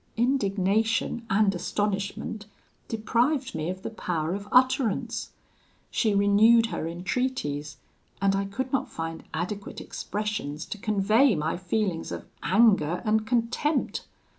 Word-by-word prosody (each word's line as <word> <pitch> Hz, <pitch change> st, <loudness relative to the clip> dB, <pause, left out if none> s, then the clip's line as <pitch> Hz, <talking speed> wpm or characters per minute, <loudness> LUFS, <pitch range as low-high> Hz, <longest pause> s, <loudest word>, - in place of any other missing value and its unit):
"Indignation 225 Hz, -1 st, +1 dB
and 200 Hz, 0 st, +3 dB
astonishment 200 Hz, +3 st, -2 dB, 0.4 s
deprived 240 Hz, +5 st, 0 dB
me 160 Hz, +1 st, -2 dB
of 185 Hz, +1 st, -5 dB
the -, -, -4 dB
power 170 Hz, -6 st, -2 dB
of 200 Hz, +1 st, -5 dB
utterance. 250 Hz, -3 st, +2 dB, 0.6 s
She 215 Hz, -4 st, +1 dB
renewed 210 Hz, +3 st, +5 dB
her 165 Hz, -, -3 dB
entreaties, 165 Hz, -, -2 dB, 0.4 s
and 195 Hz, 0 st, +2 dB
I 195 Hz, 0 st, 0 dB
could 255 Hz, +7 st, -4 dB
not 270 Hz, 0 st, 0 dB
find 165 Hz, 0 st, -5 dB
adequate 190 Hz, +5 st, -4 dB
expressions 205 Hz, -8 st, -4 dB
to 210 Hz, -, -7 dB
convey 215 Hz, +3 st, +3 dB
my 155 Hz, +1 st, -1 dB
feelings 185 Hz, -1 st, -2 dB
of -, -, -5 dB, 0.2 s
anger 195 Hz, -6 st, +3 dB
and 215 Hz, 0 st, +2 dB
contempt. 245 Hz, +5 st, 0 dB
210 Hz, 120 wpm, -27 LUFS, 185-230 Hz, 0.6 s, renewed